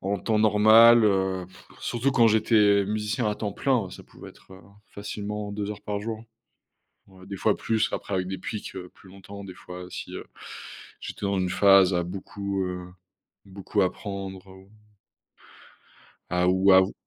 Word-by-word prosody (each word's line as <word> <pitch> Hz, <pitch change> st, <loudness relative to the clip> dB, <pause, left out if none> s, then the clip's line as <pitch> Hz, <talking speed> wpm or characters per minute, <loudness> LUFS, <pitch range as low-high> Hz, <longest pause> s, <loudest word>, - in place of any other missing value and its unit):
en 100 Hz, 0 st, -1 dB
temps 110 Hz, +3 st, 0 dB
normal, 110 Hz, +2 st, +7 dB
heu, 95 Hz, -2 st, +1 dB
pff, 95 Hz, 0 st, -19 dB
surtout 125 Hz, +3 st, -1 dB
quand 120 Hz, -3 st, +5 dB
j'étais 105 Hz, -2 st, +4 dB
musicien 105 Hz, +3 st, -2 dB
à 105 Hz, -, -1 dB
temps 105 Hz, -1 st, -4 dB
plein, 135 Hz, -2 st, +1 dB
hein, 90 Hz, -, -11 dB
ça -, -, -11 dB
pouvait -, -, -13 dB
être -, -, -19 dB, 0.3 s
facilement 105 Hz, 0 st, -6 dB
2 105 Hz, 0 st, -4 dB
heures 105 Hz, -, -7 dB
par 105 Hz, -1 st, -3 dB
jour, 110 Hz, +1 st, -5 dB, 0.9 s
ouais, 95 Hz, -1 st, -16 dB
des 100 Hz, -, -6 dB
fois 105 Hz, +2 st, +1 dB
plus, 110 Hz, -1 st, 0 dB
après 100 Hz, -, -4 dB
avec 90 Hz, -1 st, -1 dB
des 95 Hz, -1 st, -4 dB
pics 100 Hz, 0 st, -6 dB, 0.2 s
plus 95 Hz, -, -18 dB
longtemps, 100 Hz, +1 st, -11 dB
des 95 Hz, -2 st, -9 dB
fois 90 Hz, 0 st, -10 dB
si, -, -, -7 dB
heu, -, -, -7 dB, 0.7 s
j'étais 100 Hz, -, -5 dB
dans 100 Hz, -1 st, 0 dB
une 90 Hz, -, -1 dB
phase 95 Hz, -1 st, +5 dB
à 90 Hz, -, +1 dB
beaucoup, 100 Hz, +1 st, -4 dB
heu, 90 Hz, -1 st, -5 dB, 0.6 s
beaucoup 100 Hz, +1 st, -2 dB
apprendre, 95 Hz, 0 st, -4 dB
ou 95 Hz, +1 st, -16 dB, 1.6 s
à 90 Hz, 0 st, +1 dB
ou 95 Hz, +1 st, +4 dB
à 95 Hz, 0 st, +8 dB
ou 95 Hz, -, -3 dB
100 Hz, 170 wpm, -26 LUFS, 95-105 Hz, 1.6 s, à